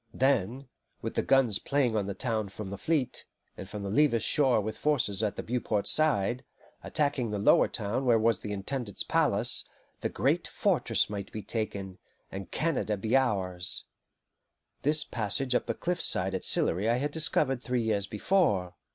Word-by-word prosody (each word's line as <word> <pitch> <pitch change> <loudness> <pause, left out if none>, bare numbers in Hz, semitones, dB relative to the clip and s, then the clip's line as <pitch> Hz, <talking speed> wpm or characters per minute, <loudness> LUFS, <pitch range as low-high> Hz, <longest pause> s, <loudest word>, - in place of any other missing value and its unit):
Then, 130 0 +1 0.4
with - - -3
the - - +1
guns 125 -6 +3
playing 140 -5 0
on 100 -2 0
the 100 - -4
town 110 -2 -2
from 100 0 -7
the 100 - -5
fleet, 155 -6 -1 0.3
and 95 - -9
from 105 0 -6
the 100 - -4
Levis 125 -3 +3
shore 130 -2 +3
with 110 +1 -4
forces 120 -10 +1
on 105 -2 0
the - - -5
Beauport 110 -4 -2
side, 125 -6 +2 0.4
attacking 140 -5 -1
the 105 - -2
lower 100 - +4
town 110 +4 -3
where 120 -2 +4
was 115 0 +2
the 105 - -6
Intendant's 105 +2 -4
palace, - - +1 0.4
the - - -2
great - - 0
fortress - - +1
might 100 -1 -6
be 110 - -6
taken, 100 -3 -4 0.3
and 95 0 -7
Canada 145 -10 -1
be 110 +5 0
ours. 95 -9 +1 1.0
This 150 +2 +3
passage 120 +4 -1
up 125 - 0
the - - -2
cliff 175 0 -2
side 95 +1 +3
at 95 - -3
Sillery 100 +7 +3
I 120 - +3
had 145 +3 -2
discovered 145 -4 +1
three 125 -1 -1
years 105 -3 0
before. 105 - +1
110 Hz, 175 wpm, -29 LUFS, 100-135 Hz, 1.0 s, lower